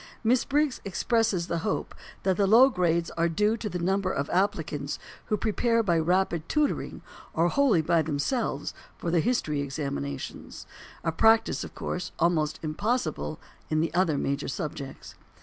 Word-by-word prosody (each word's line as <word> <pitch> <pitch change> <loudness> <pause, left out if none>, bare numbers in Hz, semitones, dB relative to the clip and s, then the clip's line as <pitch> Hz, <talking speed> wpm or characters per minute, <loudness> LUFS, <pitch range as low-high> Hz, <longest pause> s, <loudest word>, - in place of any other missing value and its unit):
Miss 240 +2 +3
Briggs 290 -1 +1
expresses 200 -2 +1
the 170 -1 -2
hope 205 +4 -2 0.3
that 190 -1 +2
the 200 +1 +2
low 240 +6 +7
grades 170 -6 +1
are 170 0 +1
due 210 +6 +2
to 215 -1 -4
the 180 - -3
number 190 +2 0
of 140 -4 -2
applicants 160 -7 -1 0.3
who 215 - 0
prepare 230 +3 +1
by 170 -5 +2
rapid 175 -1 +1
tutoring 300 -1 -1 0.3
or 165 +2 +3
wholly 240 - +3
by 165 +1 +3
themselves 155 - -1 0.2
for 170 - -3
the 170 - +3
history 160 - 0
examinations; 135 - -5 0.4
a 165 - +1
practice, 225 +6 +3
of - - -9
course, 180 - -4
almost 155 -3 +1
impossible 215 +11 -2 0.3
in 155 - +1
the 160 0 0
other 170 -4 +2
major 140 +1 -1
subjects. 140 -3 -6
175 Hz, 155 wpm, -27 LUFS, 155-215 Hz, 0.4 s, low